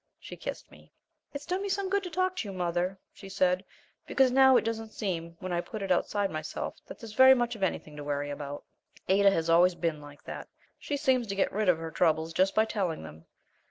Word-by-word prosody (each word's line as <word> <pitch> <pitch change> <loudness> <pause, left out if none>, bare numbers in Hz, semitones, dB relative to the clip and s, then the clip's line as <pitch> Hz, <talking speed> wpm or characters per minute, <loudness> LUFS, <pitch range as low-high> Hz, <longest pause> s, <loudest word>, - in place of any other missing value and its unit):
She - - -9
kissed - - -7
me. - - -18 0.4
"It's 285 0 -7
done 365 +2 -2
me 400 - -3
good 395 0 0
to 365 - -6
talk 370 +2 0
to 220 - -3
you, 195 - -6
mother," 180 +1 -1 0.2
she 195 - -11
said, 185 -1 +1 0.4
"because 265 -2 +3
now 265 0 +6
it - - +2
doesn't 225 -1 -4
seem, 170 -5 -4
when 185 -1 -4
I 170 - +1
put 215 +2 -7
it 195 - -2
outside 200 +2 +1
myself, 155 0 -5
that - - -9
there's 225 -3 -10
very 260 +3 +8
much 240 -1 -1
of 215 - -11
anything 155 -5 -2
to 145 - -6
worry 145 0 -2
about." 145 0 -6 0.4
Ada 200 +1 +5
has 165 -4 0
always 175 +2 +5
been 165 -3 -2
like 145 0 -13
that - - -7 0.3
she 290 - -3
seems 260 -4 +1
to 195 - -3
get 195 - 0
rid 210 -1 +1
of 175 - +4
her 165 0 -6
troubles 160 -1 +1
just 190 +3 +2
by 220 - +4
telling 190 - -2
them. 80 +1 -12
195 Hz, 230 wpm, -29 LUFS, 165-240 Hz, 0.4 s, very